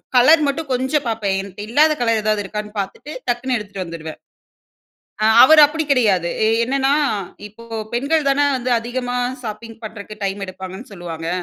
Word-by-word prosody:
Colour 300 +6 +6
மட்டும் 280 +1 -3
கொஞ்சம் 265 +3 0
பாப்பேன் 210 -4 -1
என்ட்ட 195 +1 -11
இல்லாத 300 +6 +4
கலர் 230 -2 +2
ஏதாவது 215 -1 0
இருக்கான்னு 210 +1 -6
பாத்துட்டு, 195 +9 -6 0.2
டக்குனு 245 +2 0
எடுத்துட்டு 205 -3 -6
வந்துருவேன். 160 -2 -8 1.0
ஆ - - +4 0.2
அவரு 310 +3 +7
அப்டி 315 +2 -3
கிடையாது 200 -10 +2 0.2
எ - - +3 0.2
என்னன்னா, 270 +2 +1 0.5
இப்போ 220 +3 -15 0.3
பெண்கள் 280 +4 +1
தானே 285 +1 +3
வந்து 250 0 -3
அதிகமா 245 +1 -3 0.3
ஷாப்பிங் 225 +1 -7
பண்றக்கு 215 -1 -8
டைம் 195 0 -2
எடுப்பாங்கன்னு 190 +4 -9
சொல்லுவாங்க. 165 -3 -6
225 Hz, 150 wpm, -20 LUFS, 200-260 Hz, 1.0 s, அவரு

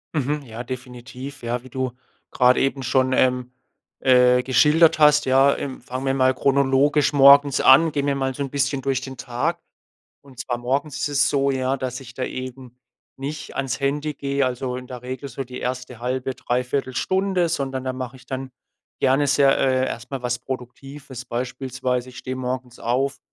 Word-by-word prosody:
Mhm. 145 0 -1
Ja, 115 -1 -7
definitiv. 125 +1 -8
Ja, 120 +1 -2
wie 130 - -13
du 130 0 -2 0.4
grad 125 0 +4
eben 135 0 0
schon, 130 +1 +2
ähm, 125 -1 +1 0.5
äh, 125 -1 +5
geschildert 150 +5 +4
hast, 150 0 +5
ja. 135 +1 +4
Ähm, 135 -3 -6
fangen 130 +2 -5
wir 135 - +1
mal 130 -1 +3
chronologisch 140 +2 +2
morgens 140 0 +6
an. 160 +5 +6
Gehen 140 -1 -1
wir 140 - +1
mal 135 -1 -1
so 140 +2 -3
'n 135 - -5
bisschen 140 0 -1
durch 135 -1 -1
den 130 0 -8
Tag. 120 0 -2 0.7
Und 130 -3 -13
zwar 120 -1 -3
morgens 135 +4 -2
ist - - -1
es 145 0 +2
so, 140 -1 +1
ja, 130 0 0
dass 130 0 -4
ich 125 -2 -12
da 130 - -3
eben 130 -1 -7 0.4
nicht 145 +3 -6
ans 130 -3 -2
Handy 145 +2 -1
gehe, 140 0 -1
also, 125 0 -2
in 125 0 -8
der 125 -2 -8
Regel 130 +2 -6
so 135 +1 -5
die 125 0 -9
erste 125 -1 -5
1/2, 130 +1 -2
3/4 125 +2 -2
Stunde, 190 0 +1
sondern, 135 -4 -2
da 130 - -2
mache 130 0 -6
ich 130 - -18
dann 130 0 -5 0.5
gerne 135 +2 +3
sehr 135 0 +4
äh, 130 -1 +2
erst 120 +1 -6
mal 135 -2 -4
was 125 0 -1
Produktives. 130 0 -8
Beispielsweise, 125 0 -3
ich 130 - -11
stehe 130 0 -5
morgens 125 -1 -4
auf 135 +3 -1
130 Hz, 185 wpm, -22 LUFS, 125-140 Hz, 0.7 s, morgens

